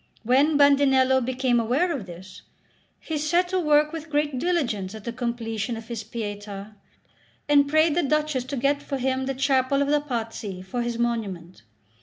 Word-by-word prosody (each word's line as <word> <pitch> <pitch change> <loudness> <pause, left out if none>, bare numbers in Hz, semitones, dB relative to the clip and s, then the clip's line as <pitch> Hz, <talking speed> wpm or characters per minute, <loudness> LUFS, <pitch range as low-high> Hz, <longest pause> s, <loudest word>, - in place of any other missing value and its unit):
When 275 +6 +3
Bandinello 270 -2 +4
became 255 -1 +1
aware 260 +11 +1
of 215 -8 -6
this, 180 +2 -11 0.6
he 315 -2 -4
set 345 +4 +1
to 375 0 0
work 300 -1 +3
with 325 -1 -7
great 295 -3 0
diligence 235 - -1
at 215 - -9
the 235 - -5
completion 235 -2 -3
of 225 +1 -10
his 230 -2 -4
Pietà, 205 -2 -6 0.7
and 285 -1 +5
prayed 310 +1 +3
the 350 - +2
Duchess 300 -3 0
to 275 +1 -5
get 280 +3 +1
for 275 - -4
him 260 0 -1
the 270 - -2
chapel 270 0 +2
of 280 0 +1
the 295 0 +3
Pazzi 225 -8 -5
for 215 +6 -4
his 235 -1 -2
monument. 205 -8 -3
260 Hz, 175 wpm, -25 LUFS, 225-290 Hz, 0.7 s, and